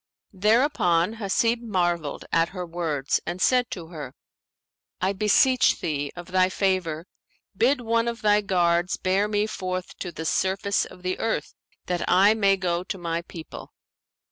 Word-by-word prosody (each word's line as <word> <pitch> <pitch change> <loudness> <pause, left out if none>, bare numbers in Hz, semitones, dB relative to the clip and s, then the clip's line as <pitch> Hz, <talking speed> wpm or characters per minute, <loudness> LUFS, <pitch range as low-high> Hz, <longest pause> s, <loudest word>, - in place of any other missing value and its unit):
Thereupon 210 - +2
Hasib 230 +3 +1
marvelled 175 -8 -1
at 165 0 +2
her 180 -2 -6
words 165 -5 -1
and 175 +2 -3
said 250 +3 +3
to 165 -4 -7
her, 150 -6 -8 0.8
"I 190 +2 0
beseech 245 +6 +3
thee, 145 -2 -2
of 175 +1 -10
thy 185 0 +3
favour, 185 -5 -1 0.5
bid 255 +6 +2
one 230 0 +1
of 235 -1 -4
thy 210 0 +4
guards 175 -2 +1
bear 190 +3 +1
me 210 0 0
forth 185 -3 -4
to 180 - -5
the 160 0 -7
surface 190 +4 0
of 180 - -14
the 185 0 -2
earth, 220 -10 -2 0.3
that 180 -1 -2
I 195 +4 +5
may 200 -3 +3
go 175 -2 -1
to 190 - -5
my 170 -1 -3
people." 170 -1 -10
185 Hz, 155 wpm, -25 LUFS, 170-210 Hz, 0.8 s, I